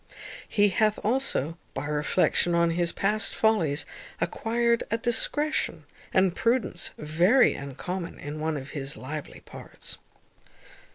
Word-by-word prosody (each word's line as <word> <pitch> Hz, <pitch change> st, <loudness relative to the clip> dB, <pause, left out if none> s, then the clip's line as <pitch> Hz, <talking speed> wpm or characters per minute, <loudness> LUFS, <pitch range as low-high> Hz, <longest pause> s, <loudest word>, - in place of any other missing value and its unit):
He 205 Hz, -1 st, +4 dB
hath 215 Hz, +2 st, +2 dB
also, 210 Hz, -, 0 dB, 0.2 s
by 135 Hz, -, -3 dB
reflection 150 Hz, +3 st, +1 dB
on 170 Hz, 0 st, +3 dB
his 170 Hz, 0 st, 0 dB
past 210 Hz, +2 st, +1 dB
follies, 175 Hz, -10 st, +2 dB, 0.3 s
acquired 235 Hz, +1 st, +1 dB
a 225 Hz, -, +1 dB
discretion 260 Hz, +6 st, +1 dB, 0.3 s
and 185 Hz, -2 st, +3 dB
prudence 230 Hz, -7 st, 0 dB
very 170 Hz, -, +4 dB
uncommon 170 Hz, +6 st, -5 dB
in 145 Hz, +1 st, -6 dB
one 155 Hz, 0 st, -1 dB
of 135 Hz, 0 st, -8 dB
his 140 Hz, 0 st, -4 dB
lively 150 Hz, +3 st, -7 dB
parts. -, -, -10 dB
175 Hz, 120 wpm, -27 LUFS, 155-225 Hz, 0.3 s, He